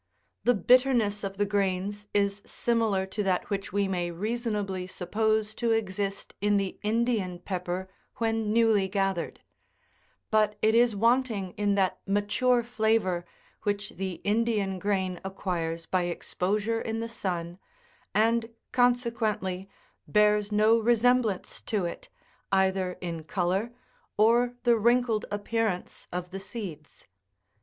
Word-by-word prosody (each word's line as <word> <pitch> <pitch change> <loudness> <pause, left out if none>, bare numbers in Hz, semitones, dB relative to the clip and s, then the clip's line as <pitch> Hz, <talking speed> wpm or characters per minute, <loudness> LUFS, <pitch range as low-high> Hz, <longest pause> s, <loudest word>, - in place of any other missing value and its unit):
The 245 - +5
bitterness 230 -1 +3
of 195 0 -4
the 205 - +2
grains 200 +1 -1
is 200 0 +1
similar 225 -5 0
to 190 +2 -4
that 190 0 0
which 200 0 -2
we 200 +1 +1
may 175 -2 -1
reasonably 205 -1 -2
suppose 215 +3 0
to 230 0 +1
exist 200 -2 -2
in 205 0 +3
the 195 -1 -2
Indian 220 -4 0
pepper 180 0 -4 0.3
when 225 -2 0
newly 220 -3 +4
gathered; 195 -2 -1 0.9
but 215 -1 +3
it 220 +1 +5
is 235 -1 +4
wanting 230 -3 +1
in 205 +1 0
that 190 -2 +1
mature 235 +5 +2
fla 225 -2 +2
vour 180 -5 -2 0.4
which 205 0 -2
the 190 0 -4
Indian 205 -3 +1
grain 190 -2 -1
acquires 170 -4 -3
by 185 -1 0
exposure 205 +5 -1
in 225 0 -3
the 230 - -3
sun, 175 -6 -4 0.6
and, 225 +1 +3 0.2
consequently, 225 -6 +1 0.4
bears 210 0 +3
no 215 +2 +4
resemblance 235 -2 +2
to 205 -5 -1
it, 170 - -6 0.4
either 190 -1 +2
in 170 -3 -4
colour 185 +7 -1 0.5
or 240 +3 +4
the 240 -2 +4
wrinkled 235 -1 +2
appearance 205 -2 -2
of 180 0 -4
the 195 - -5
seeds. 190 -8 -8
205 Hz, 130 wpm, -28 LUFS, 190-225 Hz, 0.9 s, The